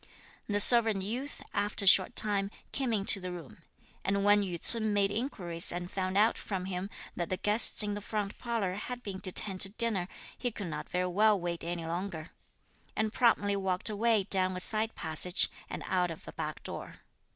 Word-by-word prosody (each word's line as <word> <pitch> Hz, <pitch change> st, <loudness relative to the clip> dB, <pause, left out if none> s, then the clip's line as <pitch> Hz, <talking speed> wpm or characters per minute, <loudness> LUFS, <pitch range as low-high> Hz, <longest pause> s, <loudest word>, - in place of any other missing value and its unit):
The 205 Hz, -1 st, -1 dB
servant 220 Hz, -3 st, +8 dB
youth, 250 Hz, +8 st, -5 dB
after 205 Hz, 0 st, -2 dB
a -, -, -1 dB
short 190 Hz, +4 st, +5 dB
time, 200 Hz, -2 st, -1 dB, 0.2 s
came 265 Hz, -3 st, -3 dB
into 200 Hz, -2 st, +2 dB
the 185 Hz, -1 st, -7 dB
room; 170 Hz, -5 st, -11 dB, 0.4 s
and 195 Hz, +1 st, -1 dB
when 205 Hz, 0 st, +4 dB
Yü 180 Hz, -4 st, -5 dB
ts'un 220 Hz, +1 st, -3 dB
made 200 Hz, -1 st, +1 dB
inquiries 190 Hz, -8 st, -1 dB
and 175 Hz, 0 st, -6 dB
found 185 Hz, 0 st, -3 dB
out 220 Hz, +3 st, +2 dB
from 190 Hz, -3 st, -5 dB
him 185 Hz, +1 st, -5 dB, 0.3 s
that 175 Hz, -, -4 dB
the 185 Hz, -, -2 dB
guests 210 Hz, +2 st, +6 dB
in 205 Hz, 0 st, -3 dB
the 205 Hz, -, -6 dB
front 205 Hz, -1 st, -5 dB
parlour 230 Hz, -6 st, -3 dB
had 245 Hz, +5 st, -7 dB
been 195 Hz, -3 st, -7 dB
detained 190 Hz, 0 st, +1 dB
to 195 Hz, -, +3 dB
dinner, 205 Hz, -4 st, -1 dB, 0.3 s
he 245 Hz, -, -3 dB
could 205 Hz, -3 st, -8 dB
not 165 Hz, -, -7 dB
very 180 Hz, 0 st, -2 dB
well 205 Hz, +3 st, +2 dB
wait 170 Hz, -1 st, -5 dB
any 170 Hz, 0 st, -5 dB
longer, 170 Hz, -1 st, -6 dB, 0.6 s
and 220 Hz, 0 st, -2 dB
promptly 205 Hz, -5 st, +1 dB
walked 190 Hz, +1 st, -1 dB
away 220 Hz, 0 st, +1 dB
down 185 Hz, -1 st, +3 dB
a -, -, -4 dB
side 220 Hz, +4 st, +1 dB
passage 170 Hz, +3 st, +3 dB, 0.2 s
and -, -, -7 dB
out 180 Hz, -1 st, -1 dB
of 165 Hz, -, -10 dB
a -, -, -9 dB
back -, -, -6 dB
door. -, -, -9 dB
200 Hz, 195 wpm, -29 LUFS, 180-215 Hz, 0.6 s, servant